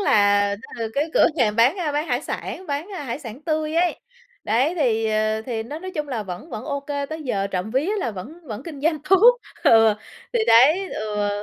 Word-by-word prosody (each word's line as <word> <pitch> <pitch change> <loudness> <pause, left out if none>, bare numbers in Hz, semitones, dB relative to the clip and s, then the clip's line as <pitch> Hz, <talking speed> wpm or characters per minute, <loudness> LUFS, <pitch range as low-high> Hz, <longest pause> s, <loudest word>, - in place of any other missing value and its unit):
là 205 - +3 0.2
tức - - -9
là - - -1
cái 300 +3 0
cửa - - +6
hàng 215 -2 +2
bán, 250 +10 +4
a, 320 -5 -2
bán 300 +3 -1
hải - - -1
sản, 375 - -5
bán, 290 +4 -3
a, - - -5
hải 240 +2 -4
sản 250 0 -9
tươi 310 -1 -1
ấy, 345 +1 +1 0.4
đấy, 255 +10 +1
thì, 225 -7 +1
ờ, 215 0 0
thì 225 -2 -3
nó 290 +7 -7
nói 370 +2 -7
chung 300 -2 -3
là 240 -5 -2
vẫn 190 - -8
vẫn 215 - -6
OK, 280 -1 -4 0.2
tới 315 0 -5
giờ 200 -8 -1
trộm 190 +2 -3
vía 280 - 0
là 240 - -1
vẫn 200 +9 -8
vẫn 220 +1 -6
kinh 300 -4 -8
doanh 310 +1 +1
tốt. 470 +6 +7 0.3
Ừ, 225 -1 +6 0.4
thì 480 - +1
đấy, 305 +12 +5
ừ, 210 -1 -2
260 Hz, 220 wpm, -22 LUFS, 215-310 Hz, 0.4 s, tốt